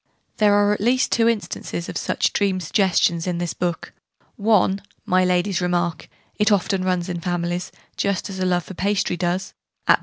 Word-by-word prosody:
There 205 -1 +4
are 205 0 +4
at 210 - -4
least 250 +4 +2
two 230 0 +4
instances 200 -5 -3
of - - -7
such - - 0
dream 195 -2 +1
suggestions 175 -1 +1
in 175 -1 -1
this 175 -1 -2
book 175 -2 -3 0.4
one, 200 -2 +2 0.2
my 185 0 +3
Lady's 180 +1 +1
remark, 175 -1 -1 0.3
'it 210 +1 +3
often 195 -1 +1
runs 180 -1 0
in 175 -2 -4
families, 175 0 -2 0.3
just 200 0 0
as 190 -2 -7
a 185 - 0
love 175 -1 +1
for 190 - -9
pastry 190 0 0
does', 180 +2 -2 0.3
at - - +6
p. - - -22
185 Hz, 185 wpm, -22 LUFS, 175-205 Hz, 0.4 s, at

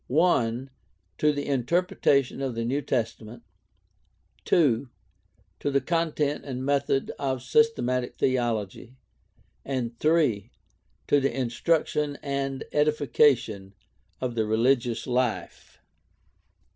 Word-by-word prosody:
(i) 130 -7 +2 0.5
to 150 - +4
the 145 -1 -3
interpretation 140 -1 +1
of 130 -3 -2
the 115 0 -2
New 135 +5 0
Testament, 115 -3 -3 1.0
(2) 135 -6 +2 0.7
to - - -1
the 140 0 +2
content 155 -3 -1
and 130 -2 -5
method 140 -1 0
of 130 -3 -2
systematic 130 - +1
theology, 120 -2 -1 0.7
and 125 -4 -3
(3) 150 - +2 0.6
to 145 - +3
the 135 0 -1
instruction 145 +4 0
and 135 -1 -2
edification 130 -9 +2 0.4
of 125 -2 -2
the 115 - 0
reli 110 +5 +3
gious 120 -2 -5
life. 125 -2 -2
130 Hz, 105 wpm, -26 LUFS, 120-145 Hz, 1.0 s, to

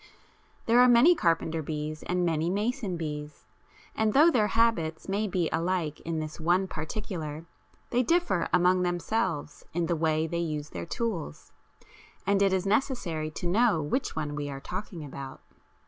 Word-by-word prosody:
There 235 +2 +4
are 250 - +7
many 245 +8 +7
carpenter 165 - 0
bees 155 0 -4
and 180 0 0
many 165 0 0
mason 210 -1 -1
bees, 150 -2 -6 0.5
and 220 -1 +1
though 315 +5 +6
their 220 -7 +3
habits 195 -8 +1
may 205 +2 0
be 180 -3 0
alike 165 -3 -1
in 165 -1 -4
this 155 +1 -6
one 175 +4 +2
particular 160 -2 -5 0.5
they 245 - +3
differ 335 - +1
among 180 +1 +4
themselves 175 -3 -1
in 170 0 0
the 170 - 0
way 160 0 +1
they 170 +1 -2
use 155 -3 -3
their - - -6
tools, 180 - -4 0.7
and 200 0 +2
it 195 -1 +4
is 190 0 0
necessary 195 - 0
to 155 - -7
know 205 +1 +3
which 155 - -2
one 150 -2 -3
we 145 -1 -3
are 135 -1 -6
talking 180 0 -6
about. 135 -1 -8
175 Hz, 165 wpm, -28 LUFS, 155-210 Hz, 0.7 s, are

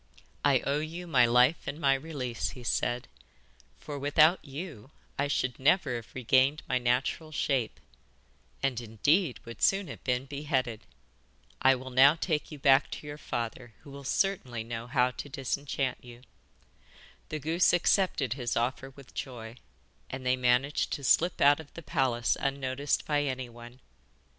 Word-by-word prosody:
'I 140 -3 +4
owe 140 +2 0
you 165 +3 -5
my 130 -8 +4
life 125 +6 +3
and 140 +3 -4
my 135 -3 +4
release,' 135 -4 -3
he 125 - -10
said, 120 +1 -1 0.7
'for 145 -2 -7
without 155 +5 +4
you 140 - -8 0.3
I 145 - +2
should 130 -3 -1
never 140 0 +3
have 115 - -11
regained 130 +4 +2
my 130 - +1
natural 125 +6 0
shape, 135 -6 -1 0.8
and, 130 -3 0
indeed, 130 - +1
would 115 0 -10
soon 195 -1 +3
have - - -9
been 125 0 0
beheaded. 135 -5 -2 0.7
I 135 0 +6
will 130 0 -8
now 135 +4 +6
take 160 -2 -2
you 150 - -7
back 135 0 +4
to - - -8
your 145 0 -7
father, 120 -2 -5
who 140 - -13
will 140 0 -9
certainly 130 - -1
know 115 0 -6
how 125 -1 +2
to 145 - -8
disenchant 135 0 -2
you.' 120 0 -13 1.1
The 155 - -3
goose 160 +4 +2
accepted 175 - +2
his 125 -3 -3
offer 130 +3 -1
with 135 -1 -16
joy, 120 -2 -7 0.5
and 130 - -6
they 125 0 +3
managed 125 +3 +1
to 140 - -4
slip 170 +6 +3
out 145 +1 +5
of 155 -2 -11
the 170 - -8
palace 130 -8 +1
unnoticed 140 0 -1
by 145 -1 +1
anyone. 125 -2 -6
135 Hz, 155 wpm, -29 LUFS, 125-145 Hz, 1.1 s, I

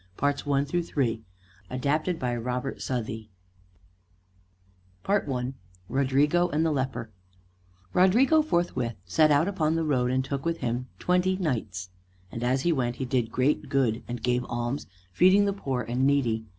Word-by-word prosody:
HERO 145 +1 +3
OF 140 - -7
SPAIN 140 -1 0
THE 175 +5 0
CID 120 -9 -1 0.5
ADAPTED 150 +7 0
BY 125 -4 -1
ROBERT 125 +3 -3
SOUTHEY 110 -3 -4 1.8
I 135 -11 0 0.4
RODRIGO 145 +6 +2
AND 160 0 +1
THE 160 - +2
LEPER 130 -5 -2 0.8
Rodrigo 245 - +5
forthwith 170 - -1
set 155 - +4
out 150 +4 +4
upon 165 -5 0
the 165 - 0
road, 125 -5 +1
and 130 +1 0
took 140 0 -3
with 165 0 -1
him 125 0 -2
twenty 180 +1 +2
knights. 110 - -3 0.4
And 115 - -5
as 130 +2 +1
he 170 - +2
went 120 -4 -1
he 130 - -3
did 120 -3 0
great 135 +3 +1
good, 130 -5 +1
and 120 0 -5
gave 125 0 +1
alms, 120 +3 -3 0.3
feeding 190 - +5
the 200 - +1
poor 135 -10 -3
and 125 +4 +1
needy. 120 -6 +1
135 Hz, 155 wpm, -27 LUFS, 125-160 Hz, 1.8 s, Rodrigo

